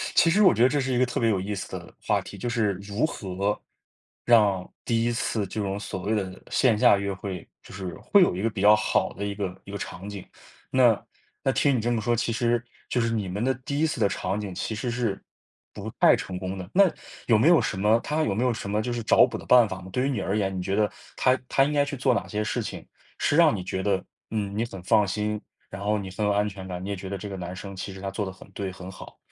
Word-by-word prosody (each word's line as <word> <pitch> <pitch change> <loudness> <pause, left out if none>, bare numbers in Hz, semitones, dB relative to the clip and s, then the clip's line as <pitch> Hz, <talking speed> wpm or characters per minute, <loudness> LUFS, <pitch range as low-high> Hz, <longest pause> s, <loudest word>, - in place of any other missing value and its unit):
其 165 - +6
实 205 +6 +4
我 185 - +7
觉 115 - +3
得 125 - +6
这 145 +1 +1
是 130 -1 -1
一 120 - +1
个 130 - +4
特 125 - -3
别 115 - +3
有 100 -4 +1
意 100 +3 -3
思 95 - -5
的 - - -12
话 - - +2
题， - - -10
就 120 - -4
是 115 -4 +1
如 100 +6 -2
何 100 - -2 0.6
让 105 -6 +4 0.2
第 115 -1 +1
1 120 - +1
次 115 -3 -1
这 105 - -4
种 100 0 -2
所 95 -2 -5
谓 110 +3 0
的 95 -2 -4
线 120 -5 +3
下 100 - +6
约 100 0 -2
会， 95 -2 -6
就 - - -14
是 95 -2 -5
会 200 - +4
有 175 - +4
一 95 - -3
个 115 - +1
比 105 -3 -5
较 105 +1 +8
好 105 - 0
的 100 - -4
一 100 0 -3
个 95 -3 -4
一 100 - -9
个 100 - -4
场 95 -1 -7
景， 100 -2 -7 0.5
那 120 -4 +4 0.4
那 135 - +3
听 140 +1 +2
你 120 - 0
这 120 +2 0
么 115 -2 0
说， 120 +2 +1
其 115 0 -1
实 120 +1 +1 0.3
就 125 - +1
是 115 - +1
你 105 -4 -1
们 100 +4 -3
的 130 +1 +2
第 140 - -2
1 160 - +3
次 150 -6 -2
的 105 - +4
场 95 0 -2
景 100 -4 -5
其 100 +5 -3
实 110 +4 -3
是 120 -5 -2 0.5
不 - - -6
太 - - +7
成 90 -1 -5
功 95 +1 -4
的， 90 -1 -7
那 200 - +7 0.4
有 115 -3 +5
没 145 +10 +5
有 170 - +6
什 - - -2
么 105 +4 +4
他 155 +5 -1
有 100 - 0
没 110 +5 0
有 125 - +2
什 105 -3 -5
么 105 +1 +1
就 120 +2 -2
是 120 -1 -3
找 - - +6
补 - - -5
的 - - -11
办 125 -2 +6
法 95 -1 -6
吗？ 95 - -10
对 125 +7 0
于 - - 0
你 120 -7 -1
而 100 +3 -1
言， 95 -2 0
你 90 - -2
觉 95 +2 -1
得 105 -1 +3 0.3
他 130 0 +3
他 135 - +4
应 150 - -1
该 145 - +4
去 145 -1 -4
做 130 0 +3
哪 - - -1
些 105 - -3
事 105 - -1
情， - - -7 0.3
是 145 - +1
让 165 -4 +6
你 95 - -4
觉 95 +1 -3
得， 95 -2 +1 0.3
嗯， 100 -2 -2
你 110 - +1
很 95 -5 -9
放 105 +2 +4
心， 105 +2 -2 0.3
然 95 +1 -7
后 105 +1 +1
你 95 -2 -5
很 105 +3 -2
有 105 - +3
安 105 +1 +2
全 95 -2 -7
感， 90 -1 -5
你 95 - -5
也 100 - -1
觉 95 0 -7
得 100 - -3
这 105 - -7
个 95 - -5
男 90 0 -5
生 100 0 -8
其 95 - -5
实 95 - -10
他 95 - -3
做 100 +1 -2
得 95 - -5
很 95 +1 -15
对、 95 0 -4
很 95 0 -9
好。 - - -12
105 Hz, 305 characters per minute, -26 LUFS, 95-120 Hz, 0.6 s, 较